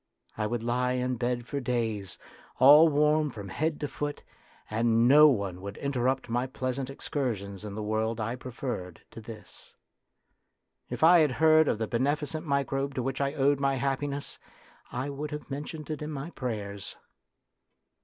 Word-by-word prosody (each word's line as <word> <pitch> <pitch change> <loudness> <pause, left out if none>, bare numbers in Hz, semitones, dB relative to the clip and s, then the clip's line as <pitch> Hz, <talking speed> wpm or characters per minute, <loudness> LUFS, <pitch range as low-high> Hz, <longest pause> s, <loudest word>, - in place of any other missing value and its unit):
I 105 -1 -1
would 120 +1 -3
lie 125 +1 0
in 125 0 -1
bed 120 0 -1
for 140 +3 -3
days, 115 -6 -2 0.4
all 150 +5 +8
warm 150 +1 +3
from 105 -6 -8
head 155 +8 -1
to 145 - -1
foot, 145 +1 -5 0.4
and 115 +1 +2
no 150 +3 +8
one 100 -9 0
would 100 +1 -7
interrupt 130 -2 -1
my 120 +2 -1
pleasant 130 0 -3
excursions 110 -9 -4
in 105 -2 -6
the 110 - -4
world 110 +2 -1
I 115 +3 -2
preferred 120 -8 -6
to 115 - -9
this. 110 -3 -11 1.1
If - - -3
1 170 +2 +8
had 150 -3 +3
heard 155 +1 +5
of - - +1
the 110 - -1
beneficent 145 +7 -1
microbe 140 0 -1
to 125 - -1
which 135 +2 -2
I 140 0 0
owed 140 0 +3
my 135 -1 +1
happiness, 140 +2 -2 0.5
I 130 +4 -3
would 145 +2 -5
have 150 -1 -7
mentioned 150 +2 -5
it 155 - -4
in 150 - -4
my 150 +2 -5
prayers. 105 - -5
130 Hz, 165 wpm, -28 LUFS, 115-145 Hz, 1.1 s, all